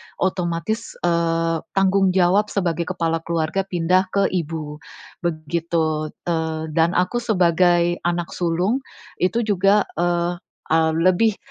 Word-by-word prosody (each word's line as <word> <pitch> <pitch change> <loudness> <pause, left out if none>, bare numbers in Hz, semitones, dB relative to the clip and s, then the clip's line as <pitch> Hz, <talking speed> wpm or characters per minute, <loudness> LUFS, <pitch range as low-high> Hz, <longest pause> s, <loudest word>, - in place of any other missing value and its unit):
otomatis, 180 +4 -2
eee, 165 -1 +1 0.2
tanggung 195 -1 +3
jawab 190 +3 +3
sebagai 170 -4 -1
kepala 165 -2 -1
keluarga 170 +4 -2
pindah 180 +1 +1
ke 200 0 +2
ibu, 155 -3 -4 0.4
begitu. 160 -1 -1 0.2
Eee, 160 -2 -2
dan 165 +2 +2
aku 180 +7 +1
sebagai 175 -5 +2
anak 175 -1 -2
sulung, 180 +8 0 0.4
itu 230 +6 +1
juga, 200 0 +3 0.2
eee, 175 0 0 0.3
e 160 +1 +2 0.2
lebih, 185 +5 +3
175 Hz, 115 wpm, -21 LUFS, 165-190 Hz, 0.4 s, tanggung